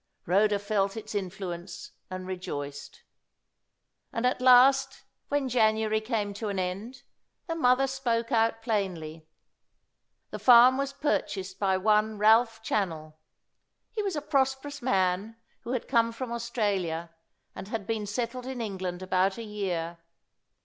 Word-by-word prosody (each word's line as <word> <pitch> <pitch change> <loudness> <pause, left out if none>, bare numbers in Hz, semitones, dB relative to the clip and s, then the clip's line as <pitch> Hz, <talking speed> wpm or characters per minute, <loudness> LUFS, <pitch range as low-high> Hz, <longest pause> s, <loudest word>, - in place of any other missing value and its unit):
Rhoda 205 +4 +3
felt 200 0 -1
its 215 0 -7
influence 180 -2 -5 0.2
and 185 0 -6
rejoiced. 145 -6 -6 1.1
And 230 - -2
at 250 0 +1
last, 265 +2 +5 0.2
when 285 -2 0
January 220 -2 +2
came 215 -3 -2
to 210 +1 -4
an 200 - -3
end, 200 +8 -4 0.4
the 330 - -3
mother 265 -4 +3
spoke 250 -3 -1
out 225 -1 +1
plainly. 170 -8 -3 1.0
The - - -5
farm 245 +1 +7
was 275 0 -1
purchased 195 -9 -2
by 190 -2 +2
one 215 +2 +2
Ralph 225 +1 +4
Channell. 165 -8 -2 0.8
He 440 - -2
was 395 -4 -2
a 295 - -3
prosperous 275 0 -1
man 195 -2 0 0.2
who 245 - -5
had 250 - -3
come 230 -2 +2
from 235 +1 -6
Australia, 200 -8 -2 0.4
and - - -8
had 220 -2 -4
been 215 -1 -2
settled 245 +4 -3
in 260 -2 -5
England 190 -4 -4
about 185 +1 +1
a 230 - -5
year. 180 -6 -3
215 Hz, 135 wpm, -28 LUFS, 190-245 Hz, 1.1 s, farm